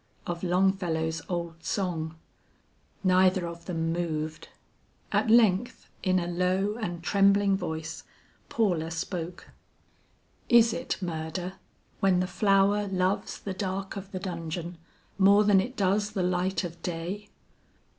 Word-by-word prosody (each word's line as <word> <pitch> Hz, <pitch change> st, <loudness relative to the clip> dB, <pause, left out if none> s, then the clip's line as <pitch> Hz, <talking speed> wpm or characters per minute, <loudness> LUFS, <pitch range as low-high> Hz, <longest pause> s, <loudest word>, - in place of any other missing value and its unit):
of 170 Hz, -1 st, -4 dB
Longfellow's 175 Hz, -3 st, +1 dB
old 170 Hz, -2 st, -4 dB
song. 165 Hz, -5 st, -2 dB, 0.9 s
Neither 185 Hz, -1 st, +4 dB
of 170 Hz, 0 st, -8 dB
them 165 Hz, -2 st, -1 dB
moved. 155 Hz, -2 st, -3 dB, 0.6 s
At 240 Hz, -, +2 dB
length, 225 Hz, -1 st, +3 dB
in 185 Hz, -1 st, +2 dB
a 175 Hz, -, 0 dB
low 185 Hz, +4 st, 0 dB
and 175 Hz, -7 st, -4 dB
trembling 200 Hz, +1 st, +4 dB
voice, 160 Hz, -3 st, -4 dB, 0.5 s
Paula 175 Hz, -8 st, +1 dB
spoke: 170 Hz, +1 st, -5 dB, 1.0 s
"Is 235 Hz, -2 st, +6 dB
it 255 Hz, -, -3 dB
murder, 170 Hz, +2 st, -4 dB, 0.5 s
when 190 Hz, -2 st, +3 dB
the 180 Hz, -, +1 dB
flower 200 Hz, +1 st, +2 dB
loves 185 Hz, 0 st, -1 dB
the 195 Hz, -, -5 dB
dark 190 Hz, 0 st, -3 dB
of 195 Hz, 0 st, -7 dB
the 185 Hz, -, -4 dB
dungeon 170 Hz, -2 st, -5 dB, 0.4 s
more 200 Hz, +2 st, +6 dB
than 200 Hz, -2 st, +5 dB
it 250 Hz, +7 st, -6 dB
does 205 Hz, +1 st, +2 dB
the 190 Hz, -3 st, 0 dB
light 180 Hz, +2 st, 0 dB
of 170 Hz, -1 st, -7 dB
day?" 180 Hz, +5 st, -4 dB
185 Hz, 125 wpm, -28 LUFS, 170-195 Hz, 1.0 s, Is